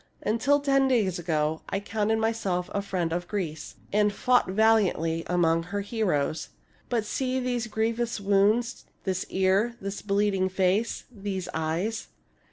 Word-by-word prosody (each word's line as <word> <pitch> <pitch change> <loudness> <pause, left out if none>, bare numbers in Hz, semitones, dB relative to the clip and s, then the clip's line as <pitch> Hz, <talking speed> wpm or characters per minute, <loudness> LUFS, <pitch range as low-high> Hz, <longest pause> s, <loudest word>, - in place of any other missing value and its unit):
Until 250 +7 +2
ten 275 -1 +3
days 210 -9 +1
ago 160 -2 0
I 195 - -1
counted 215 +1 0
myself 220 -5 -1
a 200 - 0
friend 185 -4 -2
of 175 +1 -3
Greece, 165 -7 -4 0.2
aiid 210 0 +3
fought 250 0 +2
valiantly 190 -6 +2
among 165 -2 +2
her 200 +4 -4
heroes. 180 -8 -1 0.4
But 230 -3 0
see 260 +3 -1
these 245 -2 -1
grievous 230 +1 -1
wounds, 205 +4 +2 0.2
this 190 -1 -2
ear, 190 +5 +2
this 195 0 -5
bleeding 200 -2 +1
face, 190 +4 +1
these 195 -4 -4
eyes. 165 +8 -2
200 Hz, 140 wpm, -27 LUFS, 180-225 Hz, 0.4 s, ten